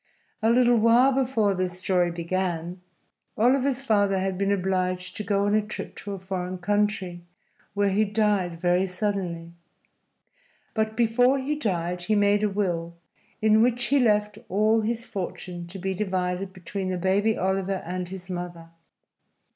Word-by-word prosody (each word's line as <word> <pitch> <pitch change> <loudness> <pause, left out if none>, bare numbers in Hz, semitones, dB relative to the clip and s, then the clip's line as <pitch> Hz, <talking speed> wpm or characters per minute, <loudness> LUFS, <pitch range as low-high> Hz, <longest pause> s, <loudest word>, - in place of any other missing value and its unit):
A 220 - +3
little 240 0 +4
while 235 +4 +5
before 250 -6 +1
this 185 -1 -2
story 180 -1 +1
began, 175 0 -3 0.6
Oliver's 265 +3 +2
father 205 -4 +2
had 190 0 -1
been 195 +1 0
obliged 185 -1 -1
to 210 - -4
go 200 0 +1
on 205 - +1
a 215 - +4
trip 210 +1 -7
to 200 - -6
a - - -4
foreign 185 -1 -4
country, 200 -2 -1 0.5
where 200 -1 +2
he 205 +3 +3
died 205 -5 0
very 180 +2 +2
suddenly. 180 -3 -3 1.2
But 220 0 -1
before 245 +3 +3
he 275 +3 -1
died 180 - -2
he 215 +5 0
made 205 0 +3
a 210 - +2
will, 175 -4 -2 0.5
in 220 0 +5
which 245 +1 +2
he 280 +3 +3
left 210 -3 +2
all 215 +4 +3
his 230 +2 -2
fortune 180 -3 -6
to 185 +3 -9
be 190 +1 -2
divided 185 -1 -2
between 185 +1 -5
the 185 - -1
baby 200 +4 +1
Oliver 190 0 -1
and 180 +1 -4
his 185 -1 -8
mother. 175 -2 -6
195 Hz, 155 wpm, -25 LUFS, 180-215 Hz, 1.2 s, while